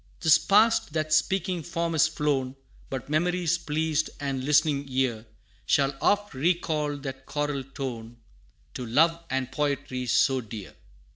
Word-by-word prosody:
'Tis 160 -1 +5
past 215 -5 +3
that 155 -1 -1
Speaking 185 +2 +1
Form 170 0 -2
is 160 0 +4
flown 145 -4 -1 0.3
But 130 -4 -5
memory's 175 +2 +1
pleased 155 0 -1
and 135 -2 -3
listening 145 0 +2
ear, 125 -4 -1 0.4
Shall 140 -1 +2
oft 205 -2 +1
recall 150 0 0
that 135 -1 -8
choral 145 -2 -2
tone, 120 -4 -7 0.6
To 125 - -5
love 165 +8 +2
and 135 -1 -2
poetry 140 -3 -2
so 130 +3 +3
dear. 105 -6 -9
145 Hz, 135 wpm, -26 LUFS, 135-160 Hz, 0.6 s, Tis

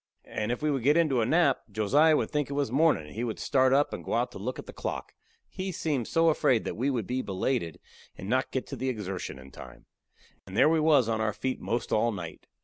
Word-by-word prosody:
And 110 +2 -3
if 120 +5 -3
we 155 - +2
would 135 -3 -1
get 145 +6 +4
into 145 -8 +3
a 110 - +1
nap, 155 -3 +3
Josiah 145 +10 +4
would - - -2
think 150 -2 -1
it - - -4
was 140 -5 -1
mornin' 150 - +3
and 75 - -12
he 115 - -3
would 115 -3 -3
start 130 -2 +2
up 140 +2 +3
and - - -6
go - - -2
out 120 +2 0
to - - -9
look 125 +6 -4
at - - -8
the - - -10
clock. - - -5 0.3
He 190 0 -5
seemed 150 -9 -2
so 165 0 +3
afraid 130 -6 +2
we 130 +5 -1
would 120 -7 -1
be 125 +4 -2
belated 95 - -2 0.4
and 95 - -7
not 130 +4 +1
get 130 - -2
to 140 - -5
that 130 - -4
exertion 95 - -5
in 65 +1 -13
time. - - -12 0.6
And 95 +2 -7
there - - +6
we 160 0 +3
was 150 -6 +4
on 110 -1 0
our 110 -1 0
feet 130 +3 -3
'most 120 +1 -2
all 115 +2 +2
night. 90 -6 -8
130 Hz, 250 wpm, -28 LUFS, 110-145 Hz, 0.6 s, there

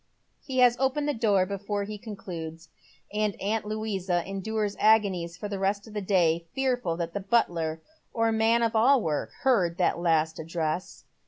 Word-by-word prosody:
He 265 -3 -5
has 245 -1 +6
opened 270 +2 +1
the 295 - +1
door 205 -6 +2
before 200 +1 -3
he 210 +1 -6
concludes, 170 -6 -7 0.4
and 210 -1 -1
aunt 210 +2 -1
Louisa 200 -5 -2
endures 205 +1 -2
agonies 195 -6 +3
for 210 - -5
the 200 -1 -4
rest 200 +1 0
of 220 - -12
the 210 - -2
day, 170 -4 +2
fearful 245 -11 0
that 170 -1 -3
the - - -2
butler, 170 -7 0 0.3
or 225 -1 +1
man 225 +1 +3
of 230 0 0
all 255 +5 +5
work, 150 -3 -1
heard 190 -11 +2
that 180 - +1
last 160 -2 +1
address. 165 +2 -3
200 Hz, 170 wpm, -27 LUFS, 170-220 Hz, 0.4 s, has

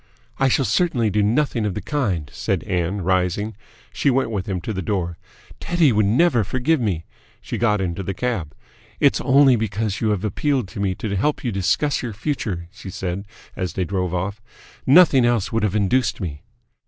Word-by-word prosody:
"I 135 - +4
shall 135 +1 +2
certainly 125 - +1
do 105 - +2
nothing 120 +2 +1
of 105 -4 -1
the - - -3
kind," 100 - -1
said - - -1
Ann, 90 +2 -1
rising. 95 +4 0 0.4
She 105 +7 +1
went 130 -3 +1
with 100 -2 -3
him 95 -2 -1
to 110 - -4
the 95 - -3
door. 85 -3 -2 0.4
"Teddy 170 -5 +2
would 105 -2 +2
never 120 +1 +3
forgive 130 - 0
me." 90 -8 -1 0.3
She - - -5
got 105 -3 +2
into 90 0 -2
the 95 0 -4
cab. 110 -10 -3 0.4
"It's - - +3
only 135 -1 +5
because 105 -2 -2
you 110 - +1
have 105 -2 0
appealed 130 +3 0
to 95 - -8
me 95 -2 0
to 100 0 -3
help 145 +10 0
you 120 - -1
discuss 105 +9 +1
your 120 -3 -4
future," 100 - -3
she 100 - -10
said, 95 +2 -4 0.3
as 90 -1 -3
they 95 - -1
drove 90 -1 -2
off. 95 +4 -3 0.5
"Nothing 140 -3 +7
else 120 -4 +1
would 115 - 0
have 105 -1 0
induced 110 +5 +1
me 80 -7 -5
105 Hz, 190 wpm, -22 LUFS, 95-125 Hz, 0.5 s, Nothing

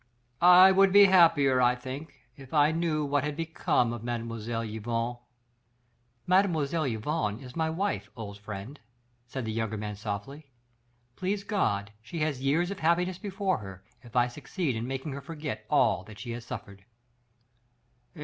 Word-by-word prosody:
I 180 +2 +9
would 195 0 +5
be 200 +1 +8
happier, 165 -9 +5
I 125 0 +4
think, 130 +5 -8
if 135 +2 -9
I 150 +1 +5
knew 160 -2 0
what 145 -1 +1
had 150 0 -2
become 160 -7 0
of 120 -2 -7
Mlle. 115 -1 -3
Yvonne." 115 +2 -3 1.1
"Mlle. 170 -5 +2
Yvonne 115 -1 -2
is 130 -2 -11
my 160 -1 0
wife, 160 - -2
old 100 -2 -7
friend," 105 +7 -8 0.5
said 130 0 -5
the 110 - -2
younger 110 -1 -2
man 105 0 -4
softly. 110 +8 -6 0.7
"Please 195 +2 -2
God 105 - -1
she 115 +9 -8
has 150 -4 -1
years 160 +7 +1
of 200 - -6
happiness 175 +3 +1
before 195 - -1
her, 95 -2 -10 0.2
if 120 -2 -16
I 120 -1 +5
succeed 130 - -3
in 115 +2 -3
making 135 +3 -4
her 140 +1 -6
forget 140 -8 -6
all 95 - +3
that 110 -1 -12
she 115 +3 -6
has 115 0 -6
suffered." 100 -4 -8
135 Hz, 160 wpm, -28 LUFS, 115-165 Hz, 1.1 s, I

